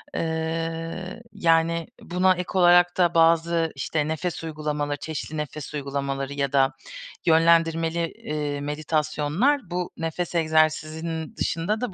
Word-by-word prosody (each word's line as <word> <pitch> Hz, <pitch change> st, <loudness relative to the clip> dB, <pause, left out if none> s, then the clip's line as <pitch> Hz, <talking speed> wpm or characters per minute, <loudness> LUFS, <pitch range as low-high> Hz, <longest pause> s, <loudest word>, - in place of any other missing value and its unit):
Eee, 165 Hz, +4 st, -3 dB
yani 165 Hz, -3 st, +2 dB
buna 185 Hz, +1 st, +2 dB
ek 180 Hz, 0 st, -3 dB
olarak 175 Hz, -1 st, +5 dB
da 175 Hz, -2 st, +3 dB
bazı, 165 Hz, 0 st, +3 dB
işte, 150 Hz, +2 st, -1 dB
nefes 160 Hz, +2 st, -3 dB
uygulamaları, 150 Hz, -2 st, -3 dB
çeşitli 155 Hz, +1 st, -5 dB
nefes 150 Hz, -1 st, -5 dB
uygulamaları 140 Hz, -1 st, -3 dB
ya 140 Hz, -1 st, -1 dB
da 135 Hz, 0 st, +3 dB, 0.5 s
yönlendirmeli, 165 Hz, 0 st, +3 dB
eee, 150 Hz, -1 st, -3 dB
meditasyonlar 155 Hz, -, 0 dB
bu 180 Hz, 0 st, -3 dB
nefes 165 Hz, +2 st, -3 dB
egzersizinin 160 Hz, 0 st, 0 dB
dışında 190 Hz, +7 st, -1 dB
da 250 Hz, -6 st, -3 dB
165 Hz, 115 wpm, -25 LUFS, 150-170 Hz, 0.5 s, olarak